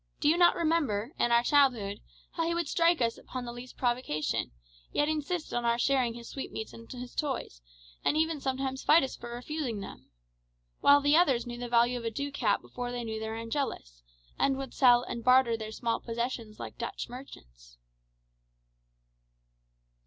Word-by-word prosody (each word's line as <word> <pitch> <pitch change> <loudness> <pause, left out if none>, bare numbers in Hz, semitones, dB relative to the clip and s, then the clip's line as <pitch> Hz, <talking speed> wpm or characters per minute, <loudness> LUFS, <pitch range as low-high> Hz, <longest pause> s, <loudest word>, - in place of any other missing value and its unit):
Do 290 - +1
you 310 - +5
not 345 0 +5
remember, 295 -8 0
in 240 - +2
our 235 0 +5
childhood, 240 -8 +2 0.3
how 330 -1 -1
he 340 - 0
would 340 -2 -1
strike 335 -2 +3
us 230 0 -1
upon 255 -1 -6
the 240 - -5
least 245 +1 -10
provocation, 240 - -1 0.4
yet 295 - +1
insist 310 +2 -2
on 240 - 0
our 235 0 +2
sharing 250 -2 +2
his 235 -1 -9
sweetmeats 220 -5 -6
and 230 0 -12
his 250 -1 -7
toys, 260 - -3 0.4
and 300 - +2
even 320 -2 +1
sometimes 265 0 -2
fight 320 +1 +6
us 265 - -3
for 240 - -9
refusing 245 -1 -4
them? 195 - -10 0.7
While 285 0 +6
the 290 +1 +4
others 275 -9 +4
knew 240 0 -6
the 245 -1 -5
value 240 +1 +3
of 230 - -8
a - - +1
ducat 265 -4 -1
before 245 -1 -5
they 245 -1 -4
knew 220 -1 -4
their 220 0 -4
Angelus, 225 - -4 0.4
and 270 -1 +2
would 270 -2 -6
sell 245 -2 +5
and 235 -1 -5
barter 255 -1 +5
their 220 -1 -6
small 230 +1 -1
possessions 230 -2 -4
like - - -8
Dutch 235 - -4
merchants." - - -12
245 Hz, 175 wpm, -30 LUFS, 230-280 Hz, 0.7 s, fight